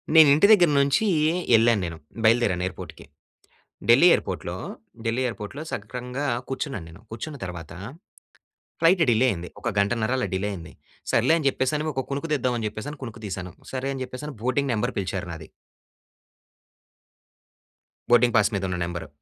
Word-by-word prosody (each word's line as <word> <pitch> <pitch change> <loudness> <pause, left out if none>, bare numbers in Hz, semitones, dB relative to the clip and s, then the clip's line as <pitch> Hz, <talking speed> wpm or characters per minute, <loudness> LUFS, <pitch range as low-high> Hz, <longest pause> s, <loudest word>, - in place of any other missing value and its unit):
నేను 160 -2 +9
ఇంటి 180 +7 +5
దగ్గర 180 -6 +6
నుంచి 140 +9 +2 0.5
ఎళ్ళాను 115 -2 +3
నేను. 85 -1 -6 0.3
బయలుదేరాను 110 -6 +3
ఎయిర్‌పోర్ట్‌కి. 90 - -9 0.8
ఢిల్లీ 120 +9 +7
ఎయిర్‌పోర్ట్‌లో, - - -3 0.5
ఢిల్లీ 115 +3 0
ఎయిర్‌పోర్ట్‌లో 115 +5 -6
సక్రమంగా 125 +6 -5 0.2
కూర్చున్నాను 135 - -4
నేను. 85 +4 -14
కూర్చున్న 140 +6 -6
తర్వాత 85 -3 -7 1.1
ఫ్లయిట్ 170 +2 +5
డిలే 120 +2 +4
అయింది. 90 -1 -6
ఒక - - -5
గంటన్నర 110 +3 +1
అలా 125 - -1
డిలే 95 +2 -1
అయింది. 85 -4 -9 0.4
సర్లే - - +3
అని 155 - -4
చెప్పేసి 130 +1 -1
అని 155 +1 -3
ఒక 135 - -1
కునుకు 140 +4 -3
తీద్దాం 130 -3 +1
అని 115 - -3
చెప్పేసి 110 +8 -6
కునుకు 115 -2 -8
తీశాను. 90 -2 -5 0.2
సరే 130 0 -3
అని 135 - -6
చెప్పేసి 145 +4 -7
బోర్డింగ్ 130 +3 0
నెంబర్ 105 - -1
పిలిచారు 95 -2 -3
నాది. 80 -1 -8 2.6
బోర్డింగ్ 120 0 +5
పాస్ 105 0 +3
మీద 100 - -2
ఉన్న 90 - -2
నెంబరు. 85 -2 -5
120 Hz, 150 wpm, -25 LUFS, 100-135 Hz, 2.6 s, నేను